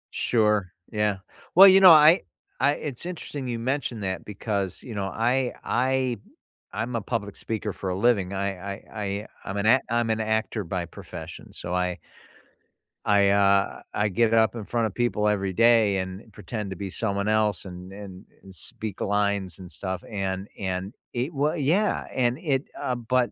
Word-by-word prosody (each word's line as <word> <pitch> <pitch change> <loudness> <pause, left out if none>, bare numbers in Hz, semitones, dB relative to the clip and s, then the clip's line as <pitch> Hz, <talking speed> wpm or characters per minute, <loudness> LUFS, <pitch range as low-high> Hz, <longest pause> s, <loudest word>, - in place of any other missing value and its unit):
Sure, 105 -5 +2 0.2
yeah, 105 -2 +1 0.4
well, 195 +3 +11
you 190 0 +8
know, 190 -1 +10
I 155 +1 +8 0.4
I 140 +2 +4
it's 140 -5 -6
interesting 155 -6 -5
you 120 -1 -2
mentioned 120 -2 -2
that 95 -1 -3
because, 100 -2 -3
you 120 - -8
know, 100 -2 -2
I 120 +6 0
I 130 0 +1 0.6
I'm 115 +2 -2
a 115 - -2
public 100 -2 -3
speaker 110 -3 -4
for 95 - -4
a - - -1
living. 100 -4 +2
I 100 0 -2 0.2
I 100 - -13 0.2
I 100 +2 -3 0.2
I'm 100 +1 -4
an 100 - 0
act 130 +4 +5
I'm 120 -1 +1
an 110 0 0
actor 110 -1 -1
by 90 0 -3
profession, 85 - -10
so 90 - -5
I 90 -1 0 1.1
I, 100 -1 +4
uh, 100 0 +3
I 105 - +1
get 110 +3 +2
up 110 -1 +4
in 115 - -5
front 115 +2 0
of 100 - -8
people 120 -3 +1
every 100 -2 +1
day 115 -1 +4
and 95 +4 -5
pretend 105 0 -5
to 95 - -6
be 100 0 -5
someone 100 0 -1
else 105 -4 +1
an 90 0 -9
an 100 -1 -10 0.2
and 95 -1 -13
speak 105 +2 -4
lines 100 -2 0
and 90 -2 -10
stuff, 95 0 -5
and 95 -2 -3
and 95 +1 -3 0.2
it 125 +6 -2
wa 145 +2 +1
Yeah, 175 +7 +1
and 125 -1 +1
it 145 -5 -1
uh, 125 - -1
but 120 +1 0
105 Hz, 180 wpm, -25 LUFS, 100-120 Hz, 1.1 s, well